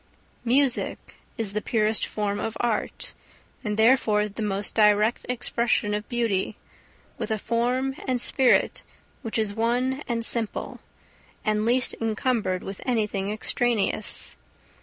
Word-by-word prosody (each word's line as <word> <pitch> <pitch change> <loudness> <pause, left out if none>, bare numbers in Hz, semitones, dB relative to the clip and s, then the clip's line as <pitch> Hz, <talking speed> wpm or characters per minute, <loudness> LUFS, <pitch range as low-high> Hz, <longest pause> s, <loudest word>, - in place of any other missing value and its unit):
Music 255 +1 +1 0.2
is 215 -4 0
the 210 - -1
purest 215 0 +2
form 205 -1 -2
of 225 - -3
art, 235 -3 -2 0.5
and 210 -2 -2
therefore 220 -3 +3
the 210 +2 -8
most 200 -1 -2
direct 210 +1 +3
expression 235 -3 0
of 210 0 -4
beauty, 225 -5 -1 0.6
with - - -3
a 220 - 0
form 250 +5 -1
and 255 -1 0
spirit 255 +1 +2 0.4
which 225 -4 -3
is 215 -2 0
one 245 +5 0
and 230 -2 0
simple, 230 -3 +3 0.7
and 215 0 +1
least 250 +2 +2
encumbered 220 -4 -1
with 195 0 -7
anything 210 -5 -1
extraneous. 215 -1 -1
225 Hz, 125 wpm, -25 LUFS, 210-240 Hz, 0.7 s, therefore